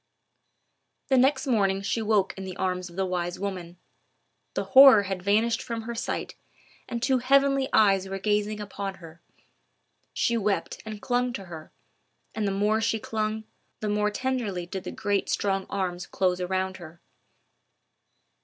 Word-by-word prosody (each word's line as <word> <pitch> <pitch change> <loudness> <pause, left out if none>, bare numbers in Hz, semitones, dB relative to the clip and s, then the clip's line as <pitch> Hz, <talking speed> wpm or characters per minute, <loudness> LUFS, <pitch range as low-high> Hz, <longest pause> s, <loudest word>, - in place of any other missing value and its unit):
The 265 - +4
next 265 +2 +3
morning 195 -6 +1
she 225 +3 -1
woke 210 -3 +1
in 195 - -7
the 185 -1 -6
arms 180 -1 -2
of 170 - -14
the 190 0 0
wise 175 -1 -3
woman; 180 -3 -5 0.8
the - - 0
horror 265 -6 +8
had 190 -2 -4
vanished 220 +4 +2
from 230 -2 -5
her 235 +1 -5
sight, 230 - -3 0.6
and 235 -1 -4
two 260 -1 +3
heavenly 275 +1 +3
eyes 195 -3 +4
were 195 - -3
gazing 210 +1 0
upon 200 -1 -5
her. 165 -2 -14 0.9
She 235 - +1
wept 205 -2 -1
and 215 -1 -7
clung 245 0 0
to 195 - -6
her, 160 -3 -10 0.6
and 215 -2 -1
the - - 0
more 210 +3 +1
she 225 - +1
clung, 215 0 -2 0.4
the 215 - -2
more 210 0 +1
tenderly 220 -6 -2
did 185 +1 -6
the - - -4
great 200 -1 -1
strong 195 -1 0
arms 180 -2 -3
close 180 -1 0
around 190 +1 -2
her. 170 -1 -12
200 Hz, 160 wpm, -26 LUFS, 190-225 Hz, 0.9 s, horror